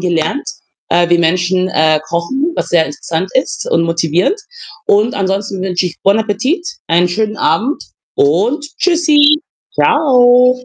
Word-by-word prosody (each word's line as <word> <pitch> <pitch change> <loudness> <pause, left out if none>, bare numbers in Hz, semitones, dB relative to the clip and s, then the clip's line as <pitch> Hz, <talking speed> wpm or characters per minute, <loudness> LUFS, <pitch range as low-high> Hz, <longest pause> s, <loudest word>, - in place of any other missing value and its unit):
gelernt, 175 - -1 0.4
äh, 175 0 +2
wie 175 - +4
Menschen, 180 +2 +1
äh, 155 -2 +2
kochen, 265 - -2
was - - -2
sehr 170 -2 +3
interessant 165 +5 -4
ist 260 - -2
und 165 - +2
motivierend. 165 - 0 0.5
Und 215 +4 +2
ansonsten 195 0 -2
wünsche 185 -1 -1
ich: 170 - -7
Bon 200 +3 +3
appétit, 225 - -1 0.2
einen 170 +2 +2
schönen 215 +4 -2
Abend 270 +9 0 0.3
und 215 - +1
Tschüssi. 305 -4 +3 0.3
Tschau. 250 -3 +3
195 Hz, 135 wpm, -14 LUFS, 170-255 Hz, 0.5 s, wie